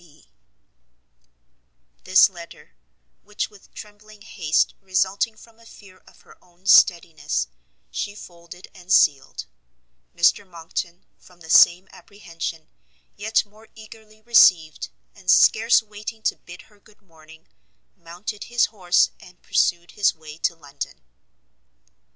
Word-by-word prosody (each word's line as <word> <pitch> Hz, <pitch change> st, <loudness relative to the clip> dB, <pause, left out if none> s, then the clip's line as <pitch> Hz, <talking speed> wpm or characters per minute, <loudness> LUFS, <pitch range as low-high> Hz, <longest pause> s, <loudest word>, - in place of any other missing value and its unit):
C. 160 Hz, -4 st, -22 dB
B. -, -, -31 dB, 1.7 s
This 185 Hz, 0 st, +6 dB
letter, 170 Hz, -3 st, -14 dB, 0.5 s
which 210 Hz, +1 st, -5 dB
with 205 Hz, -2 st, -20 dB
trembling 210 Hz, 0 st, -14 dB
haste, 165 Hz, -8 st, 0 dB
resulting 195 Hz, +3 st, -1 dB
from 230 Hz, 0 st, -19 dB
a 230 Hz, -, -20 dB
fear 185 Hz, -4 st, -17 dB
of -, -, -21 dB
her -, -, -21 dB
own 180 Hz, +1 st, -29 dB
steadiness, 160 Hz, -, +3 dB, 0.4 s
she 205 Hz, -, -5 dB
folded 175 Hz, -2 st, -13 dB
and 180 Hz, 0 st, -12 dB
sealed, 140 Hz, -, +2 dB, 0.7 s
Mr 170 Hz, +4 st, +3 dB
Monckton, 170 Hz, -1 st, -7 dB
from 180 Hz, -1 st, -22 dB
the 160 Hz, -1 st, -8 dB
same 180 Hz, +3 st, +6 dB
apprehension 165 Hz, -5 st, -8 dB, 0.5 s
yet 215 Hz, +2 st, 0 dB
more 215 Hz, +2 st, -21 dB
eagerly 220 Hz, 0 st, -16 dB
received, 180 Hz, -, +4 dB, 0.2 s
and -, -, -11 dB
scarce 225 Hz, +1 st, +5 dB
waiting 215 Hz, +1 st, -9 dB
to -, -, 0 dB
bid 175 Hz, +1 st, -14 dB
her 210 Hz, -2 st, -26 dB
good 210 Hz, +1 st, -25 dB
morning, 160 Hz, -2 st, -19 dB, 0.5 s
mounted 175 Hz, +5 st, -8 dB
his 240 Hz, -1 st, +1 dB
horse, 180 Hz, -4 st, +2 dB
and 180 Hz, 0 st, -18 dB
pursued 175 Hz, 0 st, 0 dB
his 205 Hz, -2 st, +1 dB
way 155 Hz, 0 st, -13 dB
to 170 Hz, -, -1 dB
London. 145 Hz, -, -9 dB
185 Hz, 125 wpm, -22 LUFS, 170-210 Hz, 1.7 s, This